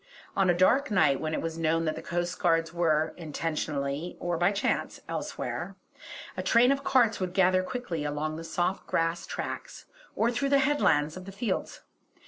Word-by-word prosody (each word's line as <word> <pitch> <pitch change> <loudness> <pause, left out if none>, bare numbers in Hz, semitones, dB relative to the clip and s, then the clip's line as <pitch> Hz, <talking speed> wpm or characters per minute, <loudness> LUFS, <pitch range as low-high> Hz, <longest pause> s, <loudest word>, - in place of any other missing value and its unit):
On 195 -2 +3
a 175 - +3
dark 260 +10 +4
night 150 -9 +3
when 155 0 -1
it - - -3
was 165 0 -4
known 165 0 +1
that 155 - 0
the - - -6
coastguards 170 -1 0
were, 160 -2 +1
intentionally 150 -1 -3
or 175 -1 -1
by 175 +4 +3
chance, 200 - -1
elsewhere, - - -4 0.6
a - - -2
train 245 +2 +5
of 275 0 0
carts 240 -6 +3
would 185 -1 -2
gather 185 -1 +4
quickly 185 -6 -4
along 150 +1 -2
the 165 - -6
soft 175 +3 -2
grass 165 +1 0
tracks, - - -6 0.3
or 235 +2 +2
through 275 +3 -1
the 280 - +5
headlands 185 - +2
of 185 - -9
the 195 - -8
fields. 200 0 -3
175 Hz, 175 wpm, -28 LUFS, 160-200 Hz, 0.6 s, train